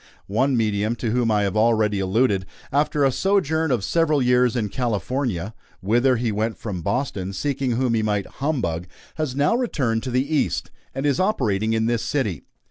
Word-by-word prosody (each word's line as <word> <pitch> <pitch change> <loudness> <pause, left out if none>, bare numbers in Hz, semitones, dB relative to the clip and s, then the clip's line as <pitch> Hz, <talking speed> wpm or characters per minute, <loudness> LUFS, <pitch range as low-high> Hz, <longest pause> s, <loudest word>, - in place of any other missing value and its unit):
One 130 +6 +1
medium 110 0 0
to 115 -1 -2
whom 120 -1 +1
I 105 -1 +2
have 100 0 -1
already 110 -2 +2
alluded, 95 0 +1 0.2
after 145 0 +2
a 135 - +3
sojourn 160 -2 +1
of 120 -7 0
several 160 0 +2
years 125 -1 +3
in 110 -4 -1
California 115 -3 -2 0.3
whither 120 +7 +2
he 115 -1 -1
went 110 0 -1
from 95 -6 -5
Boston, 100 - -2
seeking 135 +3 -1
whom 125 0 +1
he 110 - +2
might 105 -2 0 0.2
humbug 105 - -1 0.3
has 155 -5 -2
now 145 +9 +2
returned 135 - 0
to 130 - -5
the 125 +2 +1
East, - - -1 0.2
and 135 - -2
is 140 -2 +2
operating 110 - +1
in 110 0 +1
this 115 0 0
city. 110 - -1
120 Hz, 180 wpm, -23 LUFS, 105-135 Hz, 0.3 s, a